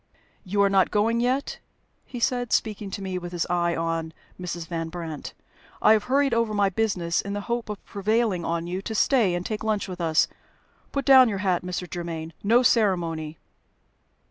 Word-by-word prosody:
"You 200 +1 +1
are - - +5
not 195 -1 +3
going 225 +3 +1
yet?" 255 +4 -1 0.5
he 245 - -7
said, 245 0 0
speaking 210 -2 0
to 195 +1 -6
me 185 -1 -3
with 175 0 -7
his 175 -1 -1
eye 175 -1 +1
on 165 -1 -2 0.3
Mrs. 175 -2 -5
Van 165 -1 -4
Brandt. 165 -3 -7 0.4
"I 215 - +6
have 215 -1 +1
hurried 275 0 +2
over 230 -2 +1
my 200 -1 +3
business 180 -4 0
in 200 - -5
the 205 - -3
hope 235 +1 -3
of 210 - -7
prevailing 205 -2 0
on 165 0 -2
you 180 +2 -3
to 220 +2 -5
stay 215 -8 +3
and 175 +1 -4
take 215 -1 -3
lunch 215 -2 0
with 180 -2 -6
us. 160 -2 +3 0.6
Put 275 -1 -2
down 260 -3 +8
your 200 - -2
hat, 180 -2 +2
Mr. 180 0 -4
Germaine. 165 -2 -5
No 235 +5 +4
ceremony!" 170 -9 +1
195 Hz, 190 wpm, -25 LUFS, 170-225 Hz, 0.6 s, down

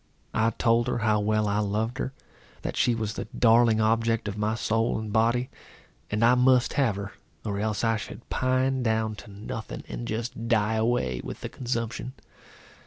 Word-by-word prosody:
I 110 +1 +3
told 115 -1 +3
her - - 0
how 110 -2 +2
well 110 0 +1
I 100 +1 +1
loved 110 +4 -1
her; 130 - -2 0.5
that - - -3
she 120 -2 +2
was 110 -2 -2
the - - -5
darling 115 -1 +5
object 115 0 +2
of 100 - -3
my 105 +1 0
soul 115 0 0
and 110 -1 -5
body; 120 +3 +2 0.6
and 105 +2 +2
I 120 - +6
must 125 0 +4
have 130 -8 +2
her, 100 0 -6 0.3
or 100 -2 -2
else 105 +1 -1
I 115 -1 +2
should 110 - -9
pine 130 +1 +1
down 110 -2 +1
to - - -11
nothing, 105 +2 -6
and 120 - -5
just 115 +1 -4
die 110 -2 +2
away 110 - 0
with - - -7
the - - -4
consumption. 120 0 -3
115 Hz, 180 wpm, -27 LUFS, 110-120 Hz, 0.6 s, I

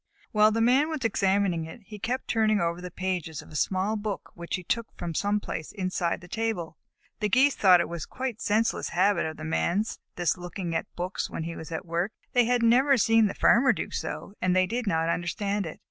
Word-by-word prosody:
While 215 0 +5
the 225 +1 0
Man 260 +6 +4
was 305 -6 -3
examining 195 -5 +1
it, 160 +8 -10
he 210 +1 -10
kept 245 +5 -2
turning 215 -2 +2
over 170 0 -1
the 180 - -6
pages 180 -4 -3
of - - -16
a - - -11
small 190 +6 0
book 210 -1 -4
which 170 0 -4
he 180 - -6
took 230 +5 -1
from 170 - -4
some 205 +5 +1
place 160 -6 -5
inside 185 -4 -2
the 180 - -12
table. 210 -6 -3 0.4
The 210 -2 0
Geese 270 +6 +4
thought 185 -3 +6
it 170 -2 -5
quite 255 -4 -4
a - - -16
senseless 225 +1 +1
habit 195 0 +2
of 155 - -6
the 155 - -7
Man's, 180 +6 0 0.2
this 175 0 0
looking 175 0 -5
at 160 - -2
books 180 +2 -3
when 165 - -4
he 165 +1 -5
was 160 +1 -8
at 160 +3 -4
work. 170 +5 -1 0.2
They 245 -1 +5
had 245 0 +2
never 260 +4 +5
seen 225 0 +4
the - - -5
Farmer 245 +1 +5
do - - -5
so, 200 - -5
and 185 0 +2
they 185 0 +4
did 235 +3 -3
not 165 -3 +1
understand 195 +3 -1
it. 155 - -8
195 Hz, 225 wpm, -27 LUFS, 170-225 Hz, 0.4 s, thought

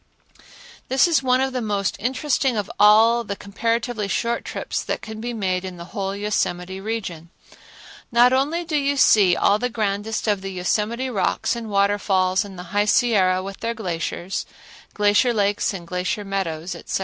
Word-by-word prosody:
This 265 +6 +4
is 330 -5 +2
one 255 0 +2
of 265 0 -1
the 250 - -2
most 205 -3 -1
interesting 260 0 0
of 205 - -3
all 225 +3 +6
the 200 -2 -4
comparatively 230 +2 -2
short 235 +4 -1
trips - - -4
that - - -4
can 220 0 -7
be 240 +1 -3
made 190 -5 -1
in 185 -1 -7
the 170 +1 -11
whole 195 -2 -2
Yosemite 190 -2 -2
region. 190 -7 -5 0.8
Not 240 +2 +5
only 300 +6 0
do 320 -2 -3
you 285 -1 +1
see 200 -8 +5
all 205 +1 +3
the 250 - -1
grandest 215 -1 -2
of 205 -2 +1
the 195 0 -5
Yosemite 215 +8 -1
rocks 210 +3 0
and 230 -2 -6
waterfalls 200 -1 +2
and 195 -2 -10
the 180 - -7
High 205 0 +3
Sierra 190 -5 +3
with 195 0 -8
their 230 0 -3
glaciers, 180 -2 -4 0.5
glacier 210 +4 +3
lakes 205 -1 +1
and 185 -4 -7
glacier 180 +4 -3
meadows, 180 -4 -3
etc. - - -4
210 Hz, 175 wpm, -22 LUFS, 190-235 Hz, 0.8 s, all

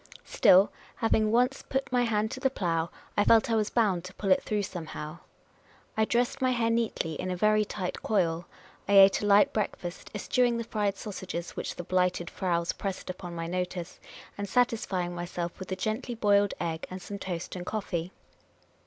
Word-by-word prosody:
Still, 190 +3 +5 0.2
having 220 -2 +2
once 250 +4 +2
put 270 -1 -1
my 250 -1 +3
hand 215 -1 0
to - - -5
the 265 - +2
plough, 170 -8 -1 0.3
I 205 - +4
felt 230 +3 +5
I - - +3
was 215 -1 +1
bound 200 -7 +1
to 185 +1 -10
pull 195 -2 -1
it 185 - +5
through 210 -1 -1
somehow. 160 -3 -6 0.8
I 220 - +3
dressed 240 +3 0
my 260 - +3
hair 235 -2 +1
neatly, 230 -8 0
in 185 - -3
a 180 - -1
very 215 +3 +3
tight 190 -3 -4
coil. 175 -5 0 0.4
I 200 - +1
ate 195 0 +7
a 205 - -1
light 205 0 +5
breakfast, 185 -4 -3
eschewing 240 +3 +1
the 230 - -2
fried 205 -3 -1
sausages 185 -4 -5
which - - -5
the 175 - -6
Blighted 180 -1 0
Fraus 170 -2 0
pressed 190 -2 -4
upon 175 -1 -8
my 165 0 -3
notice, 180 0 -4 0.4
and 200 -1 -3
satisfying 195 -6 +1
myself 175 0 -4
with 185 0 -8
a - - 0
gently 220 +5 -3
boiled 205 -2 +3
egg 165 -1 -3
and 185 - -6
.some 200 +2 -7
toast 175 -2 -5
and 180 -1 -6
coffee. 180 -5 -3
195 Hz, 190 wpm, -29 LUFS, 175-220 Hz, 0.8 s, ate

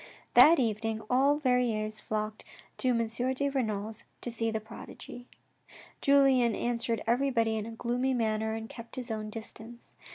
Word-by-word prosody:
That 330 +2 +8
evening 225 -2 -1
all 275 +3 +4
Verrieres 235 -6 0
flocked 215 0 -4 0.4
to 255 - -1
M. 230 -2 +2 0.3
de 280 +2 0
Renal's 220 -5 -3 0.2
to 240 - -4
see 225 0 -1
the 220 0 -1
prodigy. 230 +2 -11 0.7
Julien 270 -5 +4
answered 235 -2 -1
everybody 235 -2 +1
in 215 0 -3
a - - -6
gloomy 245 +3 -1
manner 220 -1 0
and 225 0 -6
kept 230 0 -10
his 250 -3 -5
own 215 -1 -4
distance. 225 +2 -9
230 Hz, 150 wpm, -30 LUFS, 220-250 Hz, 0.7 s, That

